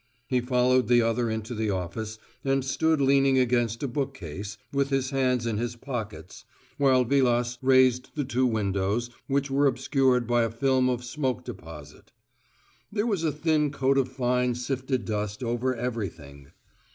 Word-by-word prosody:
He 125 -1 0
followed 125 0 +2
the 120 0 +5
other 115 +1 0
into 110 +2 -4
the 110 -1 -1
office, 100 +4 -4 0.3
and 135 -1 +1
stood 160 +3 +1
leaning 135 -1 +4
against 120 -1 +1
a - - 0
bookcase, 105 - -5 0.2
with 140 0 +1
his 135 -1 0
hands 130 -3 +1
in 110 -2 -1
his 120 0 -3
pockets, 120 -4 -7 0.4
while 130 -2 +4
Vilas 120 -2 +1
raised 130 -1 +4
the 145 -3 -1
two 130 0 +1
windows, 105 +1 -1 0.2
which 140 0 0
were 140 +1 +3
obscured 130 -1 +2
by 120 +1 +2
a 115 - +1
film 130 +2 +1
of 125 -1 -2
smoke 130 -1 -2
deposit: 80 - -10 0.8
there 205 +1 0
was 200 -8 0
a 160 - +2
thin 150 0 +1
coat 135 -1 +1
of 130 -1 0
fine 125 -1 0
sifted 130 +1 -2
dust 105 0 -3
over 120 +2 -1
everything. 85 - -5
125 Hz, 160 wpm, -26 LUFS, 115-135 Hz, 0.8 s, the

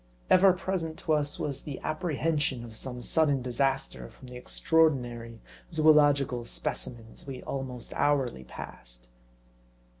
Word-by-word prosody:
Ever 190 +1 +7
present 175 -3 -3
to 160 - +1
us, 145 -1 0
was 140 -2 -3
the 145 -3 -6
apprehension 155 -5 -1
of 115 -2 -10
some 125 +1 -6
sudden 145 -4 +2
disaster 135 +2 -1
from 130 - -14
the 125 - -9
extraordinary 125 -5 +1 0.3
zoological 145 -5 +4
specimens 115 - -5
we 135 -2 -6
almost 130 -3 -5
hourly 135 - +1
passed. - - -10
135 Hz, 120 wpm, -29 LUFS, 120-155 Hz, 0.3 s, Ever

